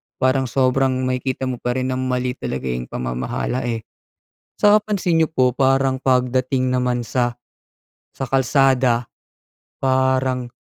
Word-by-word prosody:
parang 130 Hz, 0 st, +1 dB
sobrang 130 Hz, +1 st, +1 dB
makikita 130 Hz, +1 st, -2 dB
mo 130 Hz, -2 st, -3 dB
pa 125 Hz, 0 st, -2 dB
rin 130 Hz, 0 st, -1 dB
ng 130 Hz, -, -2 dB
mali 125 Hz, -1 st, -1 dB
talaga 65 Hz, -, -5 dB
yung 60 Hz, 0 st, -3 dB
pamamahala, 60 Hz, -, -3 dB
eh. 115 Hz, -2 st, -3 dB, 0.7 s
'Tsaka 210 Hz, 0 st, +5 dB
pansin 180 Hz, -5 st, +1 dB
n'yo 160 Hz, -, +2 dB
po 130 Hz, -5 st, +2 dB
parang 135 Hz, 0 st, +2 dB
pagdating 130 Hz, 0 st, +1 dB
naman 125 Hz, -1 st, 0 dB
sa 120 Hz, -1 st, -1 dB, 0.8 s
sa 135 Hz, -, -4 dB
kalsada, 130 Hz, -2 st, +2 dB, 0.8 s
parang 130 Hz, -1 st, +1 dB
130 Hz, 130 wpm, -20 LUFS, 125-135 Hz, 0.8 s, Tsaka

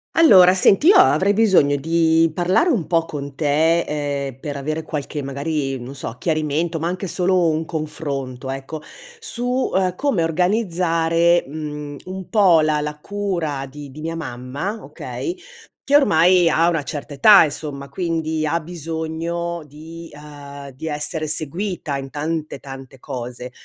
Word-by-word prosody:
Allora, 190 Hz, -, +7 dB
senti 195 Hz, -, +4 dB
io 400 Hz, -, +8 dB
avrei 205 Hz, -, +5 dB
bisogno 190 Hz, -10 st, +4 dB
di 165 Hz, +2 st, +2 dB
parlare 185 Hz, -, +2 dB
un 215 Hz, -, 0 dB
po’ 165 Hz, -1 st, +1 dB
con 140 Hz, -3 st, -7 dB
te, 160 Hz, +3 st, +2 dB
ehm, 140 Hz, -4 st, -3 dB
per 145 Hz, -1 st, -5 dB
avere 155 Hz, +3 st, -3 dB
qualche 150 Hz, -1 st, -5 dB
magari 140 Hz, 0 st, -3 dB
non 125 Hz, +3 st, -8 dB
so, 135 Hz, -4 st, -6 dB
chiarimento, 155 Hz, +2 st, -1 dB
ma 165 Hz, -, -2 dB
anche 185 Hz, +3 st, -3 dB
solo 180 Hz, 0 st, +2 dB
un 155 Hz, +1 st, -1 dB
confronto 140 Hz, -5 st, -5 dB
ecco, 135 Hz, +3 st, -6 dB, 0.4 s
su, 255 Hz, -, -2 dB
ehm, 185 Hz, -1 st, +2 dB
come 230 Hz, -8 st, 0 dB
organizzare, 170 Hz, -2 st, +2 dB
mhmm, 150 Hz, -1 st, -6 dB
un 185 Hz, 0 st, -7 dB
po’ 190 Hz, -7 st, +5 dB
la 155 Hz, -1 st, +1 dB
la 150 Hz, 0 st, -4 dB
cura 170 Hz, -8 st, -3 dB
di 145 Hz, 0 st, -10 dB
di 150 Hz, +3 st, -10 dB
mia 165 Hz, +1 st, -4 dB
mamma, 145 Hz, -, -5 dB
okay, 350 Hz, -, -6 dB, 0.5 s
che 285 Hz, -, +2 dB
ormai 180 Hz, -, +5 dB
ha 165 Hz, +1 st, +3 dB
una 165 Hz, -4 st, -1 dB
certa 145 Hz, 0 st, -6 dB
età 200 Hz, +9 st, +7 dB
insomma, 145 Hz, -2 st, -5 dB
quindi 160 Hz, 0 st, -2 dB
ha 165 Hz, +3 st, 0 dB
bisogno 165 Hz, +1 st, -4 dB
di 160 Hz, +3 st, -11 dB
ehm, 145 Hz, -1 st, -11 dB
di 135 Hz, +5 st, -8 dB
essere 155 Hz, +1 st, -2 dB
seguita 155 Hz, 0 st, -3 dB
in 135 Hz, 0 st, -6 dB
tante, 155 Hz, +2 st, -3 dB
tante 135 Hz, -1 st, -11 dB
cose. 125 Hz, -1 st, -7 dB
160 Hz, 150 wpm, -21 LUFS, 145-175 Hz, 0.5 s, io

